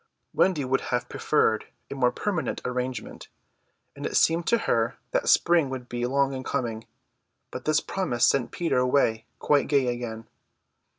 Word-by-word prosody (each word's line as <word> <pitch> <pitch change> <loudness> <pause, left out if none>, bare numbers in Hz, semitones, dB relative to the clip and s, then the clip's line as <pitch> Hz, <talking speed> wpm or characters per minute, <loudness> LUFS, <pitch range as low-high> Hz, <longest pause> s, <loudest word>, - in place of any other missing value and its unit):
Wendy 160 -8 +2
would 135 +1 +1
have 125 -1 -1
preferred - - +1 0.2
a - - -2
more 125 -3 +2
permanent 190 -6 -2
arrangement; 125 -2 -4 0.7
and - - -9
it - - 0
seemed 165 +1 +2
to 235 - +4
her 115 - 0
that - - 0
spring 170 -5 +4
would 130 -2 -6
be 120 0 -2
long 140 +1 +1
in 130 -1 -5
coming; 115 -3 -3 0.6
but - - -7
this 155 0 +3
promise 150 -12 0
sent 130 -4 +1
Peter 165 -7 0
away 125 -3 +1
quite 145 -1 +2
gay 140 -3 +2
again. 115 -2 -6
130 Hz, 160 wpm, -26 LUFS, 120-150 Hz, 0.7 s, to